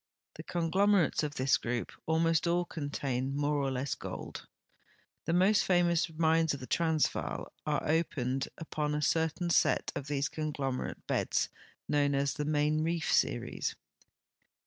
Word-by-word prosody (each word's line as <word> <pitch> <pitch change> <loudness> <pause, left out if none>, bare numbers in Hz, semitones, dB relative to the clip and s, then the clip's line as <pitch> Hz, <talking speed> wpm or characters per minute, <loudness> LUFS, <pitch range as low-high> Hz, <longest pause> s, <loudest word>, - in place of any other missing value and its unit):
The - - -8
conglom 185 +4 +2
erates 180 -7 +3
of 150 -1 -3
this 130 +1 +3
group 120 0 -3 0.2
almost 165 +1 +2
all 175 +1 +2
contain 140 -4 -3
more 145 +1 +1
or 135 - 0
less 130 +1 -2
gold. - - -7 0.8
The - - 0
most 190 +4 +4
famous 175 -2 +2
mines 160 -1 +2
of - - -9
the 130 - -7
Transvaal 160 +1 0
are 150 -2 0
o})ened 135 -5 0
ui>on 150 -2 -2
a - - -2
certain 160 +3 +1
set - - +3
of 140 - -4
these 145 0 0
conglomerate 145 -4 -3
beds - - 0 0.4
known 145 -1 +2
as 140 0 +1
the 150 -2 -3
Main 150 +1 +1
Reef 165 0 0
series. - - 0
155 Hz, 145 wpm, -31 LUFS, 140-165 Hz, 0.8 s, most